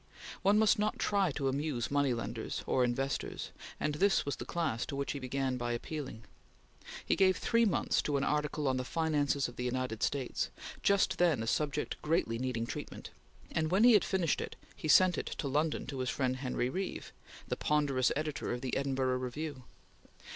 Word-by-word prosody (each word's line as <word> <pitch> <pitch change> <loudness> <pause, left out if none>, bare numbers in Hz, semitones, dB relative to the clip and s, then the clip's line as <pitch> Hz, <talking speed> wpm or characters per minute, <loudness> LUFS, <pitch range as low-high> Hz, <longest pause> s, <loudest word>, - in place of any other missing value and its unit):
One 200 +2 +4
must 215 -1 +4
not 210 +1 0
try 200 -3 +2
to 135 -1 -1
amuse 135 -3 -1
moneylenders 120 -6 -1
or 130 - +2
investors, 135 +3 -2 0.3
and 150 - 0
this 195 +6 +3
was 140 - -2
the - - -6
class 155 -10 -1
to 140 - -4
which 140 0 -2
he 140 - -4
began 130 0 -1
by 120 -1 -2
appealing. 130 -2 -5 0.8
He - - +2
gave 190 -1 +4
three 230 0 +3
months 200 - +1
to 145 -1 0
an 135 - 0
article 150 0 0
on 130 -1 +2
the 130 - -1
finances 145 -2 +1
of 120 - -11
the 125 - -3
United 125 -3 -2
States, 135 -3 -1 0.3
just 190 -3 +2
then 165 -10 +3
a - - -3
subject 150 +4 -1
greatly 150 -8 0
needing 125 -3 -1
treatment; - - -7 0.4
and 155 0 0
when 190 +5 +3
he 245 0 +8
had 210 - +6
finished 180 -5 +1
it, - - -5 0.2
he - - -5
sent 180 +3 +6
it - - -5
to 145 - -3
London 150 +3 0
to 135 0 -5
his 130 -1 -1
friend 130 0 0
Henry 130 -2 -1
Reeve, 185 +8 -4 0.3
the - - -1
ponderous 145 -4 +2
editor 150 -1 -2
of 120 - -3
the 130 -2 -2
Edinburgh 130 -2 0
Review. 130 +1 -5
140 Hz, 190 wpm, -32 LUFS, 130-160 Hz, 0.8 s, he